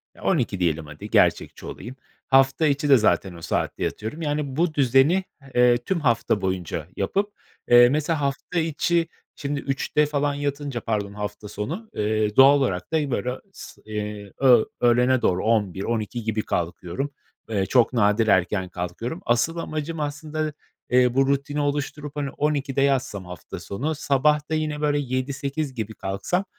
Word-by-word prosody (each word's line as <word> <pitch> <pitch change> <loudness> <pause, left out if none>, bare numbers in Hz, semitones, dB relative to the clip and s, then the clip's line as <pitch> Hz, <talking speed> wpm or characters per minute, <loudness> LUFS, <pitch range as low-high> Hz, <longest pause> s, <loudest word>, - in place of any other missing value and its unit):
Ya, - - -15
12.00 125 - +1
diyelim, 80 -3 0
hadi, 75 0 -9
gerçekçi - - +2
olayım. 125 +2 -8 0.3
Hafta 135 +3 +4
içi 145 0 0
de 135 - +8
zaten 105 -4 +1
o 85 - -11
saatte 80 - -2
yatıyorum. 110 +10 -4
Yani, 145 -3 -2
bu 165 +1 +1
düzeni, 140 +6 +4 0.3
eee, 125 0 +5
tüm 170 +9 -2
hafta 120 -6 +1
boyunca 90 -4 -3
yapıp, 200 - -1 0.4
eee, 120 0 +8
mesela 150 +2 0
hafta 140 +5 -1
içi 165 +1 +1 0.3
şimdi 140 0 -3
3.00'te 140 +2 0
falan 145 -1 0
yatınca, 140 -3 -3
pardon, 105 -3 -2
hafta 105 0 -6
sonu, 105 - -5
eee, 105 0 0
doğal 135 +2 +8
olarak 100 -8 -1
da 150 -3 +1
böyle 125 0 -1 0.2
s - - -12
eee, 105 -1 -5
öğ 125 -4 +6 0.2
öğlene 125 +1 +4
doğru 90 +2 +1
11.00-12.00 110 +2 -1
gibi 110 0 -1
kalkıyorum. 90 +10 -3 0.4
Eee 100 -3 0
çok 120 +5 +3
nadir 110 -1 +3
erken 95 -1 +2
kalkıyorum. 90 - -5
Asıl 120 +8 +1
amacım 155 0 -4
aslında, 150 +1 -3 0.4
eee, 125 -1 +4
bu 135 +1 +3
rutini 140 +1 0
oluşturup, 145 0 -3
hani, 145 -2 -2
12.00'de 140 -2 -1
yatsam 130 -8 0
hafta 90 -2 -8
sonu, 140 +11 -3
sabah 150 +1 +1
da - - -2
yine 155 -1 -2
böyle 145 -1 +2
7.00-8.00 135 +2 -3
gibi 110 -3 -4
kalksam, 105 - -2
130 Hz, 155 wpm, -24 LUFS, 105-145 Hz, 0.4 s, de